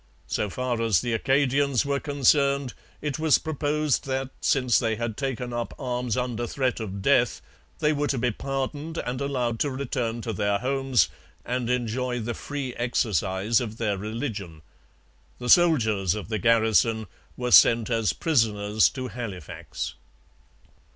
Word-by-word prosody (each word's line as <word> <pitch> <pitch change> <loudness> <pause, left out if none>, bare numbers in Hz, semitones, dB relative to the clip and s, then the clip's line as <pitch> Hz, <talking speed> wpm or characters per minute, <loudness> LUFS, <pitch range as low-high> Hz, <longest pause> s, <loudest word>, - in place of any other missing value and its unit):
So 105 - -2
far 125 +2 -2
as 110 -7 +3
the 120 - -2
Acadians 135 +2 +2
were 140 0 0
concerned, 140 -2 +2 0.3
it 150 -1 -2
was 160 -2 +4
proposed 150 -2 -1
that, 135 0 -2
since 125 -4 +3
they 115 -3 0
had 115 0 -3
taken 125 -2 -3
up 120 0 -4
arms 125 -2 -2
under 120 -2 -2
threat 130 -1 -1
of 100 -3 -5
death, 125 -4 +3 0.4
they 150 +1 +2
were 145 0 0
to 135 - -1
be 120 +1 +1
pardoned 140 +6 -4
and 125 -1 -3
allowed 125 -5 -1
to 145 - +1
return 125 -3 -3
to 115 -1 -4
their 100 0 +1
homes 135 +1 +1 0.4
and 125 -1 -2
enjoy 125 0 -1
the 120 +1 -3
free 140 0 -5
exercise 105 - +1
of 110 -2 -5
their 110 -4 0
religion. 105 - -5 0.7
The 125 0 -5
soldiers 110 - +4
of 105 -1 -6
the 110 -2 -1
garrison 110 0 +3 0.3
were 125 0 -2
sent 115 0 +6
as 115 -6 +2
prisoners 105 - +2
to 130 -1 -5
Halifax. 105 -11 -6
125 Hz, 150 wpm, -26 LUFS, 110-135 Hz, 0.7 s, sent